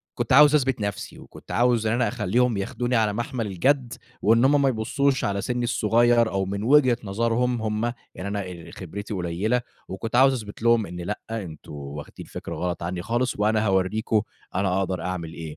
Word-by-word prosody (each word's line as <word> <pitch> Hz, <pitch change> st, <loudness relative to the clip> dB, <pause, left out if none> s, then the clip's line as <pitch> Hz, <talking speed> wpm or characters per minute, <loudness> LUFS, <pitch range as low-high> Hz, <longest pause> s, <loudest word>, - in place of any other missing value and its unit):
كنت 120 Hz, 0 st, -1 dB
عاوز 150 Hz, +2 st, +7 dB
أثبت 135 Hz, -5 st, +2 dB
نفسي 100 Hz, -1 st, -4 dB
وكنت -, -, -12 dB
عاوز 120 Hz, -2 st, +2 dB
إن 110 Hz, -, +2 dB
أنا 120 Hz, +1 st, +2 dB
أخلّيهم 120 Hz, +4 st, +1 dB
ياخدوني 120 Hz, +5 st, -1 dB
على 110 Hz, -2 st, +2 dB
مَحمَل 120 Hz, +1 st, -3 dB
الجَد 125 Hz, +6 st, +1 dB, 0.3 s
وإن 115 Hz, +4 st, +4 dB
هم 140 Hz, +1 st, +4 dB
ما 135 Hz, -, +4 dB
يبصّوش 130 Hz, +4 st, 0 dB
على 100 Hz, -1 st, 0 dB
سِنّي 120 Hz, +1 st, -2 dB
الصغير 115 Hz, +1 st, +3 dB
أو 95 Hz, 0 st, 0 dB
من 100 Hz, +2 st, -4 dB
وجهة 130 Hz, -1 st, +5 dB
نظرهم 115 Hz, +3 st, 0 dB
هم، 110 Hz, +2 st, -1 dB, 0.2 s
يعني 95 Hz, +2 st, -5 dB
أنا 100 Hz, 0 st, -2 dB
آآ 90 Hz, -3 st, -9 dB
خبرتي 100 Hz, +4 st, -6 dB
قليّلة 95 Hz, +7 st, 0 dB, 0.3 s
وكنت 110 Hz, +5 st, -3 dB
عاوز 135 Hz, +1 st, +6 dB
أثبت 105 Hz, +1 st, -11 dB
لهم 115 Hz, -2 st, +3 dB
إن 90 Hz, +1 st, -7 dB
لأ، 100 Hz, +4 st, -3 dB
أنتم 95 Hz, -9 st, -6 dB
واخدين 70 Hz, 0 st, -8 dB
فكرة -, -, -7 dB
غلط 90 Hz, -1 st, -3 dB
عنّي 90 Hz, +1 st, -3 dB
خالص 120 Hz, +4 st, 0 dB
وأنا 110 Hz, +1 st, +2 dB
هاورّيكم 105 Hz, +3 st, +1 dB, 0.3 s
أنا 95 Hz, 0 st, +1 dB
أقدر 95 Hz, -3 st, -2 dB
أعمل 85 Hz, -3 st, -4 dB
إيه. 80 Hz, -2 st, -8 dB
110 Hz, 185 wpm, -24 LUFS, 95-120 Hz, 0.3 s, عاوز